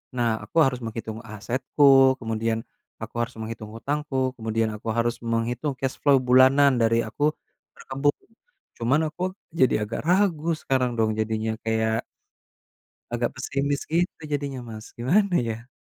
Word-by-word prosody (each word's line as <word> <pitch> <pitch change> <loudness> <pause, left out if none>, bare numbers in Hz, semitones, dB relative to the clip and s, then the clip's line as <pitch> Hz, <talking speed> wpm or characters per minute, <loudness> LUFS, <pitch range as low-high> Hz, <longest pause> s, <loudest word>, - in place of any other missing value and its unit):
nah 115 -3 +1
aku 105 - -7
harus 135 -3 +1
menghitung 115 -1 -5
asetku, 130 +5 +4
kemudian 115 -1 -2 0.4
aku 110 - -9
harus 120 +1 -2
menghitung 110 -1 -6
hutangku 135 0 -1
kemudian 110 0 0
aku 105 - -10
harus 115 0 0
menghitung 120 +4 -2
cash 135 0 -3
flow 140 -1 +5
bulanan 130 +1 +6
dari 115 0 +3
aku 110 +6 -4 0.5
berkebun, 140 +2 -1 0.6
cuman 130 +6 +2
aku 155 - -13 0.4
jadi 130 - +5
agak 110 +2 -4
ragu 180 -4 +2
sekarang 125 -2 0
dong 110 -1 +2
jadinya 110 0 -1
kayak 110 0 0 1.1
agak 120 0 -1
pesimis 140 +2 -2
gitu 170 +1 0
jadinya, 140 -3 -3
Mas, 110 -2 -10
gimana 180 - +2
ya? 115 0 -5
120 Hz, 135 wpm, -25 LUFS, 115-140 Hz, 1.1 s, bulanan